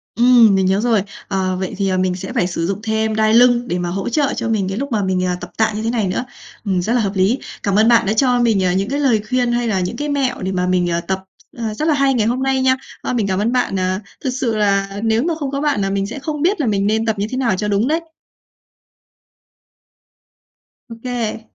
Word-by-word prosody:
Ừm, 235 -3 +6
mình 190 -1 +2
nhớ 190 +1 +2
rồi. 225 -4 +2 0.2
Ờ, 190 -2 -1
vậy 190 - -3
thì, 195 -1 0
ờ, 185 - 0
mình 185 -1 0
sẽ 190 +1 -7
phải 180 - +1
sử 165 -2 -2
dụng 195 +1 -2
thêm 220 0 0
đai 220 0 +2
lưng 245 +1 +5
để 180 - -2
mà 175 0 -2
hỗ 195 +5 -3
trợ 280 +3 +1
cho 230 - -3
mình 200 -4 0
cái 195 - -4
lúc 280 +2 -4
mà 215 -3 0
mình, 185 -1 0
ờ, 180 -1 0
tập 175 - -8
tạ 220 0 +2
như 215 - -3
thế 225 - 0
này 230 -4 0
nữa. 185 +7 -2 0.4
Ừm, 190 -3 0
rất 220 +6 -1
là 245 - +2
hợp 200 -3 0
lý, 195 +8 +2 0.2
cảm 200 -1 0
ơn 215 +2 +4
bạn 235 -1 +5
đã 205 - +1
cho 250 +1 +2
mình, 225 -5 +2
à, 180 -1 +2
những 195 +3 -1
cái 285 +2 -1
lời 245 -7 +2
khuyên 250 -1 +1
hay 240 0 0
là 200 -4 0
những 180 -1 -3
cái 295 0 -3
mẹo 270 -3 -1
để 190 0 -2
mà 180 -1 -1
mình, 180 -1 +1
à, 170 0 0
tập 190 +1 -3 0.3
à, 225 -2 -3
rất 305 +8 -2
là 315 - +4
hay 275 -1 +2
ngày 225 -4 +1
hôm 250 +3 0
nay 265 -1 +1
nha. 260 0 +3 0.3
Ờ, - - -3
mình 225 -5 0
cảm 190 -1 0
ơn 215 +3 +1
bạn, 245 -6 0
à, 185 +1 0 0.2
thực 265 - 0
sự 250 -3 -1
là 195 -1 0
nếu 225 +2 +2
mà 340 - 0
không 280 -3 -3
có 275 0 -2
bạn 290 -9 +1
là 195 - 0
mình 195 0 -1
sẽ 235 +7 -6
không 300 +1 -4
biết 365 +5 +1
là 255 - 0
mình 200 -1 +1
nên 220 +1 +1
tập 220 -2 -1
như 205 - -1
thế 255 - -3
nào 235 -7 +1
cho 210 - -2
đúng 210 +4 +1
đấy. 320 +2 +1 2.9
Ô - - -7
kê. 235 -3 -3
220 Hz, 270 wpm, -18 LUFS, 195-245 Hz, 2.9 s, Ừm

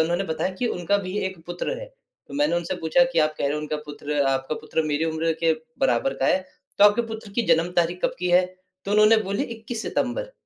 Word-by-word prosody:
उन्होंने 175 +4 0
बताया 160 +2 -1
कि 240 +6 -1
उनका 180 -2 0
भी 185 0 -5
एक 190 -2 -6
पुत्र 175 - -3
है। - - -7 0.4
तो - - -9
मैंने 290 -11 +2
उनसे 175 +2 -2
पूछा 175 +10 +3
कि - - +1
"आप 155 -1 +3
कह - - -1
रहे 140 - 0
हो 150 - -1
उनका 150 0 -3
पुत्र 145 0 -3
आपका 135 +2 -1
पुत्र 160 - -1
मेरी 150 +1 0
उम्र 165 0 0
के 165 -1 +4 0.3
बराबर 270 0 +2
का - - +3
है - - +4 0.4
तो 205 - +7
आपके 205 +3 +5
पुत्र 220 -2 -7
की 235 - +1
जन्म 165 +2 +2
तारीख़ 175 +1 +2
कब - - +1
की 180 0 -1
है?" 180 +1 +5 0.4
तो 195 - -4
उन्होंने 215 +1 +6
बोली 200 +1 -1
"21 225 0 -6
सितम्बर" - - -2
180 Hz, 235 wpm, -24 LUFS, 160-215 Hz, 0.4 s, तो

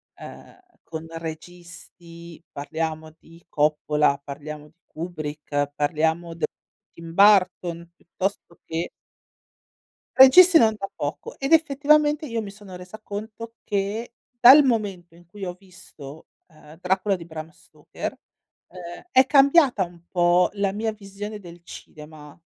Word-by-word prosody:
ehm, - - -13 0.2
con 160 0 -8
registi 170 0 -11
parliamo 155 +2 -5
di 165 +1 -19
Coppola, 150 -1 +1
parliamo 150 +1 -9
di 170 +3 -35
Kubrick, 150 -3 -5
parliamo 160 +3 -1
d 170 - -11 0.5
Tim 165 0 -11
Burton 180 -4 +3
piuttosto 180 0 -6
che 165 +1 -4 1.3
Registi 330 +7 +8
non 220 -4 +4
da 195 -1 -5
poco 470 - -6
ed 275 +4 -1
effettivamente 300 0 +3
io 230 -4 -3
mi 205 - -7
sono 200 -2 -12
resa 180 +4 -11
conto 220 +2 -8
che, 210 +3 -3 0.3
dal 275 +5 +9
momento 200 -9 -2
in 175 0 -20
cui 195 +2 -8
ho 180 - -5
visto, 165 -6 -14 0.2
ehm, 155 0 -18
Dracula 190 +2 0
di 170 -2 -10
Bram 160 -1 -8
Stoker, - - -9 0.5
ehm, 175 -1 -10
è 260 0 +5
cambiata 275 - +4
un 170 -1 -11
po' 175 0 +3
la 200 -1 -1
mia 220 +2 -2
visione 205 0 -8
del 175 -2 -13
cinema, 150 -2 -13
180 Hz, 130 wpm, -23 LUFS, 160-215 Hz, 1.3 s, dal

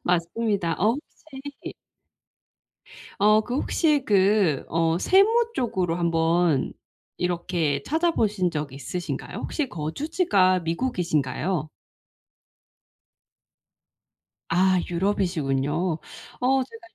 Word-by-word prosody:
맞습니다. 180 0 0
어 215 +4 +3 0.4
혹시 270 +1 -8 1.4
어 215 +2 +5
그 245 +3 -5
혹시 295 -3 +1
그 195 -6 +3
어 165 +1 +1
세무 445 - +4
쪽으로 185 -9 -1
한번 165 -3 +1 0.4
이렇게 170 -5 -1
찾아보신 225 - +1
적 150 -4 -4
있으신가요? 145 +6 -5
혹시 290 -5 -3
거주지가 185 - +1
미국이신가요? 165 - -1 2.8
아 185 +2 +3
유럽이시군요. 170 -4 0 0.4
어 265 +1 +3
제가 450 - -14
185 Hz, 195 characters per minute, -25 LUFS, 165-235 Hz, 2.8 s, 어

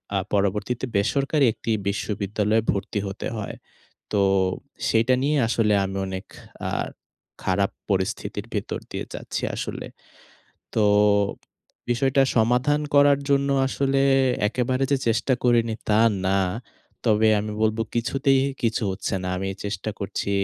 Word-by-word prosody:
আ - - +3 0.2
পরবর্তীতে 105 +5 0
বেসরকারি 140 +8 +2
একটি 115 - -4 0.2
বিশ্ববিদ্যালয়ে 105 +1 0
ভর্তি 100 +1 -2
হতে 100 +1 -5
হয়। 105 - -5 0.6
তো 105 - +2 0.7
সেটা 115 +3 +3
নিয়ে 145 +2 +2
আসলে 110 -2 +2
আমি 95 0 -4
অনেক 95 0 -5 0.4
আ - - -2 0.7
খারাপ 100 +1 +1 0.2
পরিস্থিতির 100 +2 -2
ভিতর 105 - -2
দিয়ে - - -4
যাচ্ছি - - -4
আসলে। - - -5 0.9
তো, 110 - +3 1.1
বিষয়টা 135 +2 +3
সমাধান 125 +6 +3
করার 140 0 +6
জন্য 140 0 +3 0.2
আসলে 135 0 0 0.5
একেবারে 130 +3 0
যে 140 - +4
চেষ্টা 115 +4 +1
করিনি 115 -2 +3 0.2
তা 105 - +4 0.3
না, 95 +1 +3 0.7
তবে 110 0 +4
আমি 105 0 -4
বলব 110 0 +1 0.2
কিছুতেই 135 +3 +2 0.2
কিছু 115 +1 0
হচ্ছে 95 +1 -3
না 90 - -3
আমি 95 +1 -2 0.2
চেষ্টা 100 +1 -3
করছি, 100 0 -3
110 Hz, 125 wpm, -24 LUFS, 100-130 Hz, 1.1 s, করার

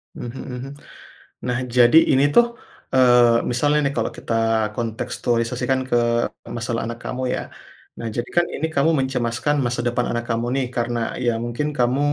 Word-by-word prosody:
Mhm 120 +2 -7
mhm. 125 +2 -6 0.8
Nah 125 -1 0 0.2
jadi 120 +5 +7 0.2
ini 135 +1 +4
tuh, 240 - +7 0.5
eee, 120 -2 +5
misalnya 145 +5 +2
nih - - -6
kalau 115 - 0
kita - - -4 0.4
kontekstualisasikan 120 +2 -1
ke - - +1 0.6
masalah 115 0 -2
anak 115 +1 -6
kamu 130 - -4
ya. - - -1 0.6
Nah 115 - -5
jadi 120 - -3
kan 175 - +5
ini 160 - -1
kamu 140 +3 +3
mencemaskan 130 +1 0
masa 120 0 -1
depan 120 0 0
anak 120 0 -2
kamu 115 0 0
nih 135 - +1
karena 120 0 -1 0.3
ya 120 - +3
mungkin 120 +5 -2
kamu, 125 +2 +2
120 Hz, 160 wpm, -22 LUFS, 120-130 Hz, 0.8 s, jadi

